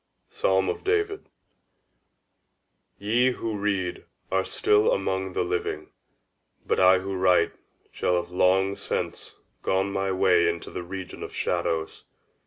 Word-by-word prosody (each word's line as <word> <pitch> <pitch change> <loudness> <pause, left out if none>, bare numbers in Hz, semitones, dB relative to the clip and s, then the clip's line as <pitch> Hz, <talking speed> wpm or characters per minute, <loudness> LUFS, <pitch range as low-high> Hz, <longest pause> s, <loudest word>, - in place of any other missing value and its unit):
_ - - -29
—Psalm 95 0 +2
of - - -3
David. 415 0 -1 1.7
Ye 120 +5 +2
who 115 -2 -4
read 100 -3 -2 0.3
are 95 0 +2
still 105 +2 +2
among 95 -1 -1
the - - 0
living; 90 0 -3 0.7
but - - 0
I 95 0 +6
who 95 +1 -4
write 90 -1 +3 0.4
shall 90 - 0
have 90 0 -2
long 95 +2 +3
since - - -4 0.3
gone 95 +1 0
my 95 0 0
way 90 -2 +4
into 85 0 -5
the - - -5
region 95 +1 -7
of - - -7
shadows. 80 -1 -2
95 Hz, 135 wpm, -26 LUFS, 90-100 Hz, 1.7 s, I